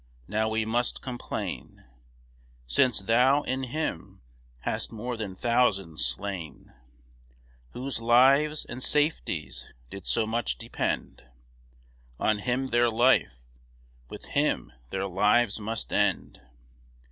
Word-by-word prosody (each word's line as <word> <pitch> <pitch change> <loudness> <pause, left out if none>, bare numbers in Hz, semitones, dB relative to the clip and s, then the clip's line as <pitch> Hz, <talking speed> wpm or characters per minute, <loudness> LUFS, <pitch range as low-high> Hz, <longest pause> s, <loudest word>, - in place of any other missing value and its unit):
Now 110 +2 0
we 110 0 0
must 120 +2 -1
complain, 125 -2 -6 0.8
Since 105 - +2
thou, 125 +7 +4
in 130 +1 -2
him, 155 +6 -4 0.4
hast - - -2
more 120 +3 -4
than 105 -4 -5
thousands 100 -8 +1
slain, 85 +6 -3 1.0
Whose 130 -2 -4
lives 135 +6 +4
and 125 +2 -7
safeties 145 - 0 0.2
did 100 -2 -9
so 115 - +2
much 110 - -1
depend - - -3 1.0
On 110 -1 +1
him 125 +4 -1
their 120 0 +3
life, 120 - +3 0.7
with - - -9
him - - 0 0.2
their 95 +6 -2
lives 105 +4 +2
must 110 +1 -4
end. - - 0
115 Hz, 110 wpm, -27 LUFS, 100-125 Hz, 1.0 s, thou